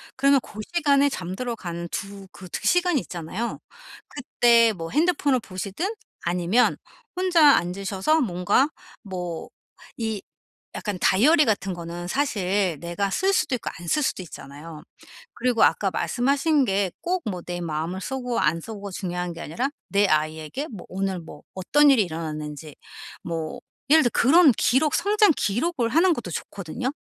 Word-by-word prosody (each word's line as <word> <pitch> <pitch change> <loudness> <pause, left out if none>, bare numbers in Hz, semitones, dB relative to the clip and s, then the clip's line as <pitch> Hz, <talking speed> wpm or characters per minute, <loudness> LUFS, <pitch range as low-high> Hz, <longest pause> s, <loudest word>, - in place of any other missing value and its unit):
그러면 275 +1 +4
고 215 - -12
시간에 285 -4 +3
잠들어 230 +4 -4
간 170 -3 -6
2 195 -1 -6
그 185 - -11
2 - - -5
시간이 355 -6 +3
있잖아요. 180 +7 -5 0.5
그때 235 -4 +3
뭐 165 -3 -6
핸드폰을 295 -4 +2
보시든 200 - -4 0.3
아니면 180 +7 +2 0.4
혼자 345 -6 +5
앉으셔서 195 - 0
뭔가 200 - +2 0.3
뭐 180 -5 -5 0.5
이 220 -3 -3 0.5
약간 205 -3 -3
다이어리 300 - +5
같은 195 -3 0
거는 175 +1 -6
사실 200 - 0
내가 175 +5 -2
쓸 385 - +1
수도 265 - +1
있고 235 - -4
안 170 - -9
쓸 300 - +2
수도 190 - -1
있잖아요. 150 0 -10 0.5
그리고 245 -2 +2
아까 195 -2 +1
말씀하신 275 - +1
게 195 -3 0
꼭 360 +1 -1
뭐 180 -3 -5
내 175 0 -5
마음을 165 +3 -3
쓰고 250 0 -3
안 165 +2 +1
쓰고가 205 -1 -7
중요한 180 -2 -4
게 165 - -9
아니라 240 - -2 0.2
내 200 +1 +3
아이에게 155 - -1
뭐 210 - -10
오늘 190 -1 -2
뭐 160 - -12
어떤 290 +10 +4
일이 245 -6 +4
일어났는지 155 -3 -6 0.5
뭐 165 +7 -4 0.3
예를 315 +2 +7
들어 240 - +1
그런 300 +4 +6
기록 285 +4 +2
성장 415 -2 +4
기록을 240 - 0
하는 335 +8 +4
것도 220 - -6
좋거든요. 195 +10 -4
205 Hz, 305 characters per minute, -24 LUFS, 175-275 Hz, 0.5 s, 예를